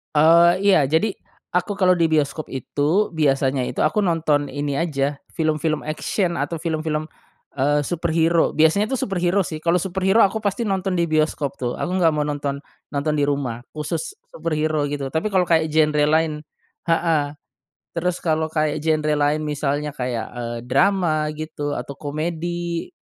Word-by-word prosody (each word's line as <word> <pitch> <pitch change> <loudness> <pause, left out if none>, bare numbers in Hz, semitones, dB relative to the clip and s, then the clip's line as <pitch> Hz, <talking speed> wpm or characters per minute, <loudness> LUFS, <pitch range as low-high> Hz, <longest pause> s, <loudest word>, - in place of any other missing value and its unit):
Eee, 170 +3 +6
iya 185 -9 +5
jadi 160 +9 +2 0.4
aku 180 +3 0
kalau 185 -2 +3
di 165 -1 +3
bioskop 155 -1 0
itu 145 +9 0
biasanya 135 -4 +1
itu - - -3
aku 155 +7 +2
nonton 160 -6 +1
ini 145 0 -3
aja 140 -4 -1 0.2
film-film 155 -1 0
action 170 +4 -1
atau 170 - -2
film-film, 155 -1 -2 0.5
eee, 145 +2 +2
superhero. 165 0 +1
Biasanya 160 +7 +4
tuh 265 - 0
superhero 190 0 +1
sih, 155 -2 -5
kalau 170 +2 +2
superhero 190 +4 +2
aku 200 +3 -1
pasti 205 +2 -1
nonton 190 -2 -1
di 170 - +2
bioskop 155 -3 0
tuh. 125 -1 -2
Aku - - -3
nggak 165 -2 +4
mau 150 - +1
nonton, 145 -1 -2 0.4
nonton 145 +2 0
di 145 - +3
rumah, 135 -5 -2
khusus 155 - -4 0.2
superhero 155 - -1
gitu, 140 -2 -3
tapi 160 +6 0
kalau 185 -1 +4
kayak 160 -1 +3
genre 150 -1 +3
lain 160 +1 +2 0.6
heeh 165 -3 +2 0.6
terus 175 +1 -2
kalau 160 -1 +1
kayak 155 -1 +1
genre 155 -1 +2
lain 145 +1 +1
misalnya 150 0 -1
kayak, 125 -3 -3
eee, 120 -1 -5
drama 160 0 +2
gitu 150 -2 -4
atau 140 - -6
komedi 170 - -3
155 Hz, 155 wpm, -22 LUFS, 145-170 Hz, 0.6 s, Eee